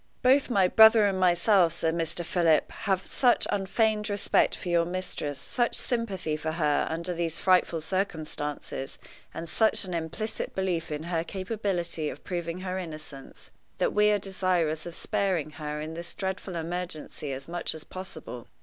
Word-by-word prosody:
"Both 265 Hz, +2 st, +5 dB
my 195 Hz, -6 st, +4 dB
brother 220 Hz, +2 st, +7 dB
and 195 Hz, -2 st, +1 dB
myself," 180 Hz, 0 st, +4 dB
said 160 Hz, -1 st, 0 dB
Mr. 165 Hz, +1 st, -1 dB
Philip, 165 Hz, -2 st, +2 dB
"have 190 Hz, -2 st, -1 dB
such 245 Hz, -2 st, +3 dB
unfeigned 210 Hz, +2 st, +1 dB
respect 205 Hz, 0 st, +2 dB
for -, -, -8 dB
your 170 Hz, -1 st, +3 dB
mistress, 170 Hz, -5 st, -3 dB
such 240 Hz, -, 0 dB
sympathy 200 Hz, -, -1 dB
for 155 Hz, +1 st, -3 dB
her 150 Hz, -3 st, +1 dB
under 170 Hz, +2 st, -3 dB
these 165 Hz, -1 st, -1 dB
frightful 180 Hz, -3 st, +3 dB
circumstances, 155 Hz, -6 st, -3 dB, 0.3 s
and 165 Hz, -, -6 dB
such 220 Hz, +6 st, +2 dB
an 180 Hz, -, -5 dB
implicit 170 Hz, +7 st, -3 dB
belief 180 Hz, -4 st, -1 dB
in 150 Hz, +1 st, -3 dB
her 165 Hz, -1 st, -1 dB
capability 185 Hz, -5 st, -2 dB
of -, -, -9 dB
proving 175 Hz, -1 st, -4 dB
her 185 Hz, 0 st, -3 dB
innocence, 155 Hz, -5 st, -9 dB, 0.3 s
that -, -, +1 dB
we 210 Hz, 0 st, +4 dB
are 210 Hz, -, +4 dB
desirous 180 Hz, -5 st, 0 dB
of 170 Hz, -, -7 dB
sparing 180 Hz, -6 st, -1 dB
her 150 Hz, 0 st, -3 dB
in 155 Hz, +1 st, -5 dB
this 170 Hz, +1 st, -6 dB
dreadful 190 Hz, -1 st, -4 dB
emergency 170 Hz, -3 st, -4 dB
as 135 Hz, +1 st, -6 dB
much 175 Hz, -1 st, -2 dB
as 155 Hz, -, -8 dB
possible. 160 Hz, -10 st, -8 dB
175 Hz, 160 wpm, -28 LUFS, 160-195 Hz, 0.3 s, brother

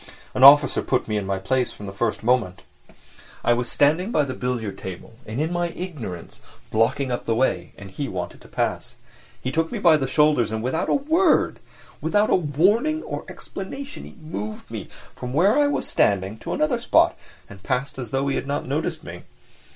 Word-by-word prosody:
An 130 Hz, -, +1 dB
officer 145 Hz, +1 st, +8 dB
put 130 Hz, -, 0 dB
me 110 Hz, -, -1 dB
in 100 Hz, -2 st, -2 dB
my 95 Hz, 0 st, 0 dB
place 125 Hz, +6 st, 0 dB
from 105 Hz, -, -10 dB
the 95 Hz, -, -7 dB
first 110 Hz, +3 st, -2 dB
moment. 115 Hz, -6 st, +1 dB, 0.8 s
I 120 Hz, -, +4 dB
was 120 Hz, +1 st, -2 dB
standing 160 Hz, +9 st, +2 dB
by 150 Hz, -9 st, +2 dB
the 130 Hz, -, -4 dB
billiard 120 Hz, -6 st, -3 dB
table 95 Hz, +4 st, -8 dB
and 110 Hz, +4 st, -4 dB
in 160 Hz, +3 st, -1 dB
my 175 Hz, 0 st, 0 dB
ignorance 155 Hz, -, -7 dB, 0.3 s
blocking 125 Hz, +4 st, +1 dB
up 120 Hz, -, -3 dB
the 115 Hz, -, +1 dB
way, 95 Hz, -8 st, 0 dB
and 100 Hz, -1 st, -10 dB
he 140 Hz, +9 st, -4 dB
wanted 90 Hz, -5 st, -5 dB
to -, -, -15 dB
pass; -, -, -2 dB, 0.4 s
he 130 Hz, -, -3 dB
took 165 Hz, +3 st, 0 dB
me -, -, -3 dB
by 165 Hz, -3 st, +5 dB
the 135 Hz, -3 st, -2 dB
shoulders 150 Hz, -4 st, +3 dB
and 110 Hz, 0 st, -3 dB
without 130 Hz, +6 st, -1 dB
a -, -, +3 dB
word—without 285 Hz, -, +1 dB
a -, -, +6 dB
warning 195 Hz, -, +2 dB
or -, -, -5 dB
explanation—moved 190 Hz, -, -7 dB
me -, -, -6 dB, 0.3 s
from 125 Hz, 0 st, -6 dB
where 195 Hz, +8 st, +4 dB
I 290 Hz, -, +4 dB
was 285 Hz, -, -1 dB
standing 100 Hz, +2 st, +1 dB
to -, -, -4 dB
another 295 Hz, -6 st, +1 dB
spot -, -, +4 dB, 0.3 s
and 100 Hz, -1 st, -13 dB
passed 130 Hz, +7 st, -2 dB
by -, -, -4 dB
as 120 Hz, -, -6 dB
though 135 Hz, +3 st, -1 dB
he 135 Hz, -, 0 dB
had -, -, -4 dB
not 140 Hz, -, -2 dB
noticed 145 Hz, +5 st, -2 dB
me. -, -, -8 dB
135 Hz, 195 wpm, -23 LUFS, 110-165 Hz, 0.8 s, officer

